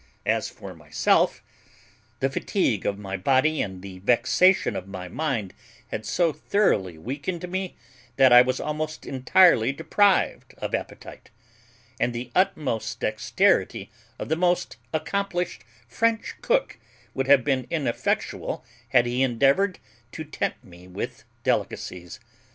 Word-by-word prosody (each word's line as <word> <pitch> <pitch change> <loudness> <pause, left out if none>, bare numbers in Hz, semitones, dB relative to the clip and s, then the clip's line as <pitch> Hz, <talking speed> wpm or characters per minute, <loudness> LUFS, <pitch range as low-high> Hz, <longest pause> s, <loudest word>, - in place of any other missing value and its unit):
As - - 0
for - - -10
myself, - - +1 0.8
the 135 - +2
fatigue 130 - 0
of 100 - -1
my 100 -1 -5
body 135 +9 +2
and 95 -2 -5
the 95 -2 -9
vexation 125 - +3
of 95 - -5
my 95 -2 -7
mind 115 - -2 0.4
had 110 0 -4
so 165 +5 +1
thoroughly 100 - +1
weakened 145 - -4
me, 185 +1 -4 0.4
that 130 -1 +6
I 120 - +10
was 130 +1 0
almost 155 +1 -4
entirely 135 -1 +4
deprived 175 +7 +1
of - - -5
appetite; - - -6 0.7
and 125 - +1
the 120 +1 -6
utmost 150 - 0
dexterity - - +1 0.3
of - - -5
the 160 - +2
most 175 -4 0
accomplished 175 - -2 0.2
French 225 - 0
cook - - 0 0.3
would 135 0 -2
have 140 -2 +6
been 130 -2 0
ineffectual 140 -8 -2 0.2
had 120 -2 +4
he 120 +2 -1
endeavoured 140 - +2 0.4
to 160 - -5
tempt 155 - -3
me 90 0 -15
with 90 - -6 0.2
delicacies. 90 -1 -2
135 Hz, 130 wpm, -25 LUFS, 110-175 Hz, 0.8 s, I